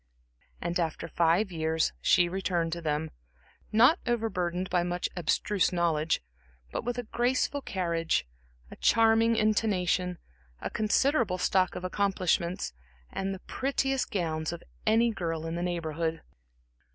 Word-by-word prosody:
And 175 +1 -2
after 165 0 -2
five 170 +5 +2
years 160 -1 0
she 175 - +4
returned 175 -2 -1
to 170 - -4
them, 155 0 -1 0.6
not 245 +10 +6
over 230 -2 0
burdened 180 0 -1
by 180 -1 +3
much 175 0 -1
abstruse 185 +3 +1
knowledge, 165 - +1 0.5
but - - -3
with 245 +1 -2
a 245 - -2
graceful 255 +5 0
carriage, 170 - -1 0.5
a - - -8
charming 225 0 +4
intonation, 190 -5 +1 0.4
a - - -4
considerable 220 -2 +2
stock 185 0 +2
of 180 - -5
accomplishments, 185 - 0 0.4
and 195 0 -2
the 190 -1 -6
prettiest 270 0 -1
gowns 160 -7 -1
of 170 -1 -7 0.2
any 230 +2 +4
girl 165 -5 -3
in 165 - -3
the 170 - -2
Neighborhood. 165 -2 -2
180 Hz, 135 wpm, -29 LUFS, 170-220 Hz, 0.6 s, not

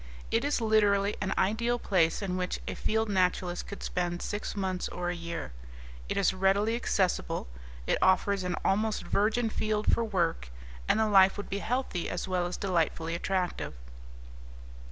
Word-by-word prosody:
It 225 +2 +2
is 290 -1 +1
literally 210 -2 +3
an 195 - -1
ideal 235 +5 +1
place 180 -4 +1
in 185 -2 -2
which 180 0 -2
a - - -2
field 220 +1 0
naturalist 180 -2 0
could 200 - -8
spend 175 -1 -2
six 205 +1 -4
months 190 -2 -2
or 175 0 -3
a - - -4
year. 170 - -5 0.6
It - - -1
is 195 -1 +3
readily 195 +4 +2
accessible, 185 - 0 0.4
it - - +1
offers 190 +1 +3
an 180 -1 -1
almost 215 +2 +1
virgin 220 +2 +1
field 215 -1 0
for 230 - +2
work, 170 - -1 0.4
and - - +3
the 220 - +4
life 195 -2 +5
would 205 - -6
be 200 - -1
healthy 235 -6 -2
as - - -3
well 180 -1 0
as 175 - -5
delightfully 165 -3 0
attractive. 180 - -2
195 Hz, 165 wpm, -29 LUFS, 180-215 Hz, 0.6 s, life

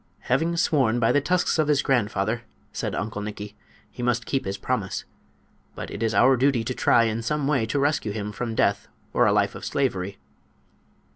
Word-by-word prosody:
"Having 165 +6 +1
sworn 135 -9 +2
by 115 - +3
the 145 - +3
tusks 180 +2 +1
of 155 - +3
his 150 -2 +2
grandfather," 110 -3 0 0.3
said - - -3
Uncle 105 0 -3
Nikki, 105 0 -7 0.4
"he - - -8
must 120 -1 0
keep 135 - -1
his 100 0 -3
promise. - - -2 0.7
But - - -6
it 105 - -6
is 115 -1 0
our 130 +2 +6
duty 130 -2 +2
to 125 +3 -3
try 120 - +4
in 115 0 -1
some 145 +5 -1
way 135 -6 +1
to 145 - -1
rescue 140 -6 +1
him 105 0 -4
from 115 +1 -4
death - - +1 0.3
or - - +4
a - - +4
life - - +2
of - - -9
slavery." 100 -8 -1
120 Hz, 195 wpm, -25 LUFS, 110-140 Hz, 0.7 s, our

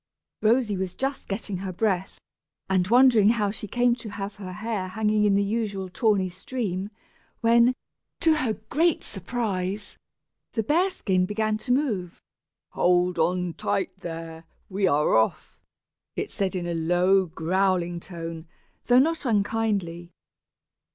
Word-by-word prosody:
Rosy 225 -1 +3
was 185 -1 -3
just 270 0 -3
getting 195 -1 -4
her 190 +1 -4
breath, 190 -1 -1 0.5
and 185 -1 +1
wondering 235 -2 +6
how 210 -3 +1
she 210 0 -6
came 245 +3 +2
to 230 -2 -8
have 200 0 -6
her 190 -2 -7
hair 215 -1 -3
hanging 210 +2 +1
in 200 -1 +4
the 200 - +3
usual 200 -3 -2
tawny 200 -1 +1
stream, 195 0 -4 0.5
when, 235 +2 +5 0.4
to 320 -1 +3
her 255 -7 0 0.2
great 325 +3 +2
surprise, 200 -1 -3 0.5
the 225 - 0
bear 340 - +2
skin 185 - 0
began 215 +1 0
to 230 +4 -4
move. 215 - 0 0.5
"Hold 180 -1 +2
on 180 +1 +1
tight 190 +2 -2
there. 165 -1 -7 0.3
We 195 0 +1
are 150 -2 +2
off," 110 0 +1 0.6
it - - -3
said, 195 -1 -1
in 180 -1 -2
a 175 - -2
low 180 +3 +2
growling 175 +1 0
tone, 165 -2 -7 0.4
though 245 - +5
not 320 +5 +3
unkindly. 205 -7 -1
195 Hz, 140 wpm, -25 LUFS, 180-225 Hz, 0.6 s, wondering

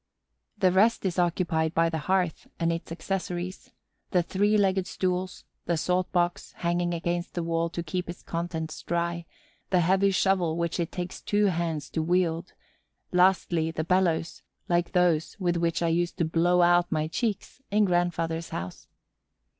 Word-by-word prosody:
The 190 -3 +3
rest 205 +4 +3
is 180 -2 0
occupied 165 -2 +1
by 165 0 +4
the 160 -1 -2
hearth 180 +1 0
and 170 -1 +1
its 165 0 -6
accessories: 180 +1 -4 0.4
the 180 -2 +2
three 205 +5 +2
legged 190 -2 +2
stools; 185 0 -2 0.2
the 170 - +1
salt 180 +3 0
box, 175 -1 0
hanging 175 0 -1
against 170 +1 -3
the 175 - -1
wall 165 0 0
to 170 +1 -4
keep 180 +2 -3
its 175 - -8
contents 165 -2 -4
dry; 170 0 -2 0.4
the 180 -2 +3
heavy 190 +3 +3
shovel 185 -4 +1
which 170 0 -1
it 170 0 -1
takes 180 0 -5
two 205 0 +1
hands 165 -5 -1
to 160 - -1
wield; 170 0 0 0.6
lastly, 180 -3 +3
the 160 -1 -3
bellows 170 -2 +1 0.3
like 175 0 +1
those 175 -2 +2
with 175 -2 +1
which 170 0 0
I 170 - +2
used 175 +1 0
to 170 - +1
blow 175 +2 +3
out 175 0 +4
my 155 -2 0
cheeks 220 +7 -3
in 210 +1 +3
grandfather's 170 -2 0
house. 90 +1 -6
175 Hz, 160 wpm, -27 LUFS, 165-185 Hz, 0.6 s, by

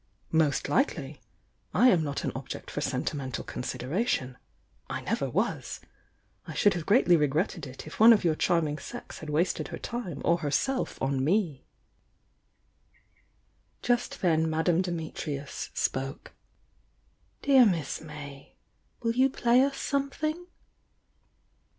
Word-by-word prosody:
"Most 155 -4 +2
likely! 150 - 0 0.5
I 245 +7 +6
am 175 -7 +4
not 145 -2 -3
an - - -1
object - - -7
for - - -3
sentimen 135 -3 -2
tal 110 - -4
consideration, 130 - -2 0.3
— - - -40
I - - -3
never - - -1
was. - - -2 0.7
I - - -7
should 205 - +4
have 170 -3 -5
greatly 200 -5 +5
regretted 150 -1 0
it 130 +1 -10
if 155 - -10
one 225 +2 +9
of 215 -4 +5
your 165 -2 +3
charming 155 -2 +1
sex - - -8
had 155 - -8
wasted 160 +5 0
her - - -6
time 220 - -5
or 170 +1 +3
herself 175 - -1
on 135 -1 0
me." 165 -4 0 2.2
Just 245 -3 0
then 160 -2 +3
Madame 165 +2 +2
Dimitrius 160 -5 -4
spoke. 135 +2 -2 1.1
"Dear 270 -2 +7
Miss 165 -8 -1
May, 145 -3 -10 0.5
will 230 - +2
you 260 +2 +4
play 245 -1 +3
us 275 0 +1
something?" 305 +5 -2
165 Hz, 130 wpm, -28 LUFS, 145-230 Hz, 2.2 s, one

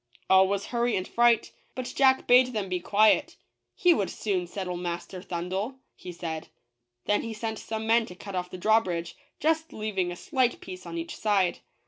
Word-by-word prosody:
All 190 0 +7
was 200 0 -1
hurry 240 0 +1
and 185 0 -2
fright; 240 -1 +3 0.2
but 255 -1 -5
Jack 265 -1 +4
bade 250 +1 +5
them 205 -4 -2
be 180 -1 -1
quiet 210 +4 +3 0.2
— - - -55
he 355 -3 +5
would 200 - -1
soon 185 -4 -2
settle 180 0 -4
Master 175 +1 -5
Thundel, 185 +8 -3 0.2
he 180 - -9
said. 165 -2 -5 0.6
Then 205 - +2
he 230 - -5
sent 220 0 -4
some 220 0 -4
men 230 0 +3
to 180 - -10
cut 200 +2 -9
off 180 -1 -3
the - - -7
drawbridge, 180 -4 +1 0.2
just 320 +1 +1
leaving 195 -5 -2
a - - -5
slight 255 - 0
piece 185 -1 -9
on 170 0 -5
each 165 0 -5
side. 200 -4 +1
200 Hz, 190 wpm, -27 LUFS, 180-230 Hz, 0.6 s, All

